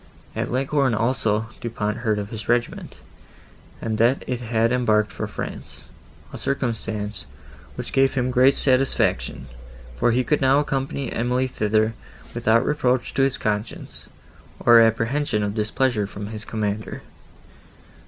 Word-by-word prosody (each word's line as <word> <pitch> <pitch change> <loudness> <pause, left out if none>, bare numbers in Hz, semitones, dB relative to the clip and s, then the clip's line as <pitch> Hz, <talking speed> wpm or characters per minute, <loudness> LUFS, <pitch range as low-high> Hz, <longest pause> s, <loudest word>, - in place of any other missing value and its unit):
At - - -2
Leghorn 135 -1 +1
also, 110 -2 0
Du 120 - -3
Pont 105 -1 -2
heard 110 -3 0
of 100 0 -5
his 110 -1 -7
regiment, 120 0 -1 0.8
and 110 -1 -3
that 120 +4 +3
it 125 -1 -3
had 115 0 +1
embarked 110 -5 +2
for - - -4
France; - - -7 0.5
a - - -6
circumstance, 110 - -3 0.5
which - - -6
gave 135 0 +3
him 125 -1 0
great 130 +2 +4
satisfaction, 130 - +1 0.5
for 120 - +2
he 125 +2 +2
could 150 +4 +1
now 135 +1 +4
accompany 135 -1 -2
Emily 125 +2 0
thither, 110 -2 +1 0.4
without 115 -1 +2
reproach 130 -4 0
to - - +1
his 135 -1 +2
conscience, 105 +1 -4 0.5
or 120 -1 +7
apprehension 115 +1 +2
of 100 0 -2
displeasure 110 0 0
from 100 0 -7
his 110 -1 -6
commander. 105 -1 -3
115 Hz, 140 wpm, -23 LUFS, 110-130 Hz, 0.8 s, or